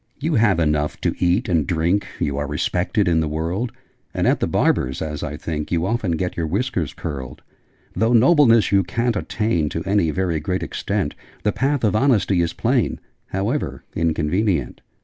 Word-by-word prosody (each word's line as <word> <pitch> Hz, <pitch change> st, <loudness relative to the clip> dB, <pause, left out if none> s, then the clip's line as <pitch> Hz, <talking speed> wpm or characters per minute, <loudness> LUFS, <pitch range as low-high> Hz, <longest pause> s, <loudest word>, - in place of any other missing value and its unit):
'You 155 Hz, +3 st, -1 dB
have 110 Hz, -, +3 dB
enough 75 Hz, -2 st, 0 dB
to -, -, +1 dB
eat 90 Hz, +7 st, +2 dB
and 80 Hz, -7 st, +1 dB
drink: 85 Hz, +4 st, +1 dB
You 70 Hz, -, -1 dB
are 70 Hz, -, -2 dB
respected 90 Hz, -, 0 dB
in 85 Hz, -2 st, +3 dB
the 80 Hz, -, 0 dB
world: 85 Hz, +10 st, -2 dB, 0.4 s
And -, -, 0 dB
at -, -, +3 dB
the -, -, 0 dB
barber's, 65 Hz, +1 st, +1 dB
as 75 Hz, -2 st, -4 dB
I 75 Hz, +1 st, -4 dB
think, 75 Hz, -2 st, -4 dB
You 85 Hz, -1 st, +1 dB
often 110 Hz, -4 st, 0 dB
get 90 Hz, +3 st, -2 dB
your 85 Hz, -2 st, -2 dB
whiskers 95 Hz, -, -1 dB
curled. 65 Hz, -5 st, -6 dB, 0.5 s
Though 115 Hz, +5 st, +1 dB
Nobleness 120 Hz, -2 st, +5 dB
you 100 Hz, -1 st, +4 dB
ca'n't 115 Hz, +6 st, -1 dB
attain 105 Hz, -7 st, 0 dB
To 80 Hz, -, -4 dB
any 100 Hz, -4 st, +2 dB
very 85 Hz, -1 st, 0 dB
great 90 Hz, +5 st, -2 dB
extent -, -, -2 dB, 0.3 s
The 105 Hz, -, +2 dB
path 140 Hz, +2 st, 0 dB
of 105 Hz, -1 st, +2 dB
Honesty 110 Hz, -7 st, +3 dB
is 85 Hz, -1 st, 0 dB
plain, -, -, 0 dB, 0.3 s
However 105 Hz, +10 st, -2 dB
inconvenient!' 80 Hz, -, 0 dB
90 Hz, 175 wpm, -21 LUFS, 80-110 Hz, 0.5 s, Nobleness